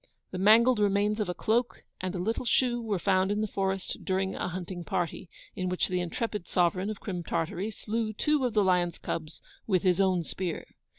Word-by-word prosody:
The 185 - -4
mangled 225 +4 +6
remains 205 +1 +2
of 210 - -1
a 180 - -2
cloak, 235 +6 0 0.2
and 185 0 -3
a - - -1
little 220 +8 -1
shoe, 240 0 +2
were 215 -4 -1
found 190 +1 +2
in 205 +1 0
the 215 - 0
forest, 195 -1 -2
during 190 0 0
a - - -3
hunting 180 0 -5
party, 170 +2 -3 0.3
in 185 -2 -2
which 180 - 0
the 180 -1 0
intrepid 205 +2 -3
sovereign 185 +2 +1
of 215 - -5
Crim 180 -4 -4
Tartary 170 +5 -2
slew 220 +1 -2
two 295 +6 +1
of 245 -3 0
the 210 - +5
lions' 180 -2 +2
cubs 155 -1 -5 0.2
with 185 -5 +2
his 185 0 +3
own 185 -3 +2
spear. 175 0 -4
190 Hz, 200 wpm, -29 LUFS, 180-215 Hz, 0.3 s, mangled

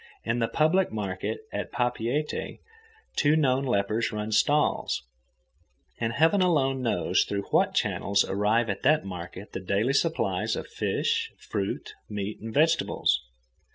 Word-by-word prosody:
In 115 +1 0
the 115 - +1
public 165 +9 +2
market 100 - -3
at - - -3
Papeete 125 +4 -1 0.6
two 150 +1 +4
known 135 -3 +2
lepers 110 -1 0
run 105 0 -4
stalls, 145 - +2 1.0
and 115 0 -1
heaven 165 - +4
alone 135 -7 +2
knows 120 - +2
through 100 0 -3
what - - +3
channels 100 0 +1
arrive 105 +4 +1
at 100 -2 -3
that 155 -8 +3
market 95 +2 -7
the - - -3
daily 100 +7 0
supplies 160 +3 +1
of - - -4
fish, 460 0 -1
fruit, 100 -2 -4 0.2
meat, 105 0 -4
and 110 +1 -6
vegetables. 150 - +2
115 Hz, 135 wpm, -27 LUFS, 100-150 Hz, 1.0 s, two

